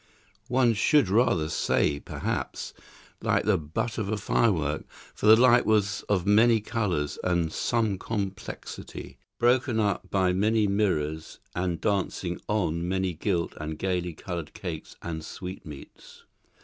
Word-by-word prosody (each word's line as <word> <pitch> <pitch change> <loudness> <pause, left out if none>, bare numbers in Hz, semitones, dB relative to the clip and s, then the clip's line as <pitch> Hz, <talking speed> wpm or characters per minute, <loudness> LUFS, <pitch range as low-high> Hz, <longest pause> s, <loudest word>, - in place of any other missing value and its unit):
One 125 -2 +3
should 130 +2 +3
rather 95 -7 +3
say, 70 -2 +1
perhaps, - - -4 0.5
like - - +1
the 105 -4 +3
butt 80 +10 -3
of 100 -2 -2
a 110 - 0
firework, 80 -8 +1 0.3
for - - -2
the 110 - +10
light 120 +1 +6
was 105 -2 +1
of 95 -4 +1
many 110 +3 +5
colours 95 -10 -2
and 85 -3 0
some 110 -5 0
complexity, 100 -3 -6 0.2
broken 120 -1 +2
up 100 -3 0
by 95 -2 +2
many 105 +3 +2
mirrors 80 -7 -1 0.2
and 90 -2 -1
dancing 95 -3 -1
on 85 -5 0
many 95 -1 0
gilt 85 0 -1
and 75 0 -5
gaily 90 -2 -1
coloured 85 -1 -6
cakes 85 -5 -6
and 80 -2 -4
sweetmeats. 90 -4 -10
95 Hz, 135 wpm, -27 LUFS, 85-110 Hz, 0.5 s, the